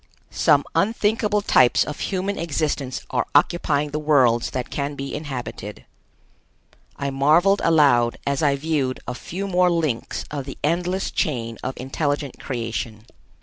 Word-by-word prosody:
Some - - +3
unthinkable 210 -1 +1
types 125 -8 +4
of 150 - -6
human 195 +1 -2
existence 150 -5 -2
are 125 -2 0
occupying 150 -1 +2
the 150 - -2
worlds 125 -6 +3
that 125 -2 -4
can 145 0 -3
be 140 0 -5
inhabited. 130 -8 -6 1.1
I 140 -1 -3
marveled 160 +9 +4
aloud 140 -8 +4
as 140 -1 0
I 145 -3 +3
viewed 140 -3 -1
a 125 - -2
few 185 +9 -5
more 180 -1 +3
links 155 -9 -1
of 140 -3 -4
the 135 - -8
endless 180 +5 0
chain 115 -6 -2
of 130 +1 -4
intelligent 145 +1 -2
creation. 115 -3 -4
145 Hz, 140 wpm, -23 LUFS, 130-165 Hz, 1.1 s, types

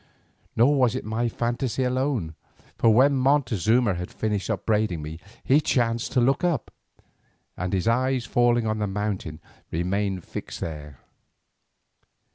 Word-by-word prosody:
Nor 135 +6 +4
was 125 -4 +3
it - - -4
my 115 +2 -1
phantasy 120 +2 -2
alone, 125 - -1 0.4
for 115 - +3
when 130 +6 +5
Montezuma 125 - +2
had 90 0 -5
finished 105 -2 -2
upbraiding 105 -5 0
me 80 +2 -7 0.2
he 140 +4 +4
chanced 120 -4 0
to 130 - +3
look 135 +6 +2
up, 170 -9 0 0.8
and 90 +1 -3
his 95 +1 -1
eyes 130 +1 +1
falling 120 -1 +2
on 110 0 -1
the 105 - 0
mountain 95 -6 -3 0.3
remained 95 +2 -1
fixed - - -7
there. 75 -4 -7
115 Hz, 135 wpm, -25 LUFS, 95-125 Hz, 0.8 s, when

